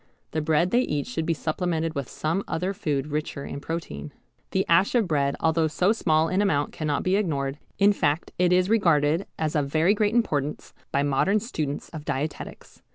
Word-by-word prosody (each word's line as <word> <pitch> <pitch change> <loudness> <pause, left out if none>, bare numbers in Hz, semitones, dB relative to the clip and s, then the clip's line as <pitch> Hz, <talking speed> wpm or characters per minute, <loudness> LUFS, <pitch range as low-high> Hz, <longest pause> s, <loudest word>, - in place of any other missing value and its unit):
The 155 - -1
bread 160 +3 +2
they 245 - +4
eat 150 - -1
should 215 -10 -3
be 165 - +1
supplemented 165 0 -1
with 140 -5 -4
some 165 +6 -1
other 185 +4 -1
food 145 -7 -1
richer 150 -1 -4
in - - -6
protein. 140 - -5 0.4
The 190 - 0
ash 185 +7 +4
of 230 -5 +3
bread 140 -3 +1
although 160 0 +2
so 180 +5 +2
small 160 -7 +2
in 185 +4 +1
amount 145 -8 +1
cannot 150 -2 -2
be 185 +2 +2
ignored, 145 -8 -1 0.2
in 205 +1 +5
fact 155 -3 0
it 180 0 +3
is 180 0 +4
regarded 165 -5 +2
as 155 -1 -1
of 145 -2 +1
very 160 +7 +3
great 210 +1 +1
importance 150 - -1 0.2
by 140 - +1
modern 145 +9 +2
students 155 - -4
of 155 -3 -8
dietetics. 150 +2 -5
160 Hz, 190 wpm, -25 LUFS, 145-185 Hz, 0.4 s, in